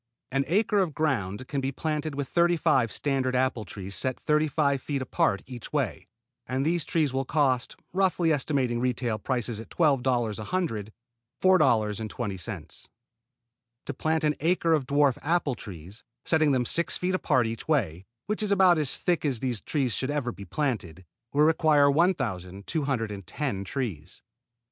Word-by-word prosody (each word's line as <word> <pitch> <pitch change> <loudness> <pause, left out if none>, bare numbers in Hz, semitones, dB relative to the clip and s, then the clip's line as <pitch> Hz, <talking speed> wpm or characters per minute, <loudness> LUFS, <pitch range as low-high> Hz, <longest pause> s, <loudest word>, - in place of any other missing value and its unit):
An 135 +1 +1
acre 205 +5 +2
of 175 -7 0
ground 125 -7 -1
can 140 -2 -2
be 135 +1 -1
planted 150 +1 -3
with 140 -1 -3
thirty 175 +2 +3
five 125 -7 +2
standard 135 -3 0
apple 125 -4 0
trees 95 +1 -7
set 130 +3 -1
thirty 150 +1 +2
five 140 -2 +1
feet 140 +1 -2
apart 100 -5 0
each 125 -3 -9
way, - - -2 0.4
and 130 +2 -1
these 170 0 0
trees 155 -5 0
will 135 0 0
cost, 130 -3 +1 0.2
roughly 180 -3 +2
estimating 135 -4 0
retail 120 -3 -1
prices 120 -1 -2
at 115 - -9
$12 125 - +1
a - - -4
hundred, 115 - -2 0.5
$4.20. 110 - 0 1.0
To 145 - -4
plant 160 +4 0
an 150 -1 +3
acre 165 +1 +2
to - - -8
dwarf 140 0 +2
apple 160 -2 +1
trees, 100 0 -9 0.2
setting 155 -2 +3
them 125 -2 +1
six 165 +3 +1
feet 180 +1 -1
apart 130 -9 +2
each 115 0 -5
way, 95 - 0 0.2
which 210 +1 -2
is 210 -1 0
about 185 -4 +5
as 145 -4 +2
thick 175 -2 0
as 135 -6 0
these 125 -4 -2
trees 135 -6 -1
should 130 +6 -2
ever 145 -4 -1
be 100 +2 -10
planted, 95 - -3 0.3
will 145 +1 +3
require 155 -2 +4
1,210 115 - -1
trees. 95 - -5
135 Hz, 160 wpm, -27 LUFS, 115-155 Hz, 1.0 s, about